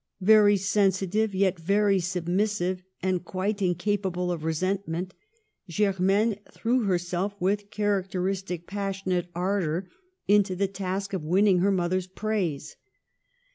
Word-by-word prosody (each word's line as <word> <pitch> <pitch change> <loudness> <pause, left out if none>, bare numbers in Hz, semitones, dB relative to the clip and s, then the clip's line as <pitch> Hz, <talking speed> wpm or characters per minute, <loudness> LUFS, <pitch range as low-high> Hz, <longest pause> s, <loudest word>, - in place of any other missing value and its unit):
Very 205 0 +6
sensitive, 195 +1 +1
yet 190 -2 +1
very 200 +3 +2
submissive, 180 +1 -1 0.2
and 185 -2 0
quite 200 +3 -2
incapa 190 +1 0
ble 180 0 -2
of 165 -3 -4
resentment, 180 +2 -2 0.6
Germaine 200 +3 +1
threw 240 0 0
herself 180 +1 -1
with 200 +3 0
characteristic 190 -3 -2
passionate 195 -2 -2
ardor 180 -1 -1 0.4
into 200 -2 +3
the 200 +2 +1
task 195 +1 -4
of 190 - -1
winning 185 +4 +3
her 195 +3 +3
mother's 185 0 0
praise. 190 -6 -3
190 Hz, 115 wpm, -26 LUFS, 180-200 Hz, 0.6 s, Very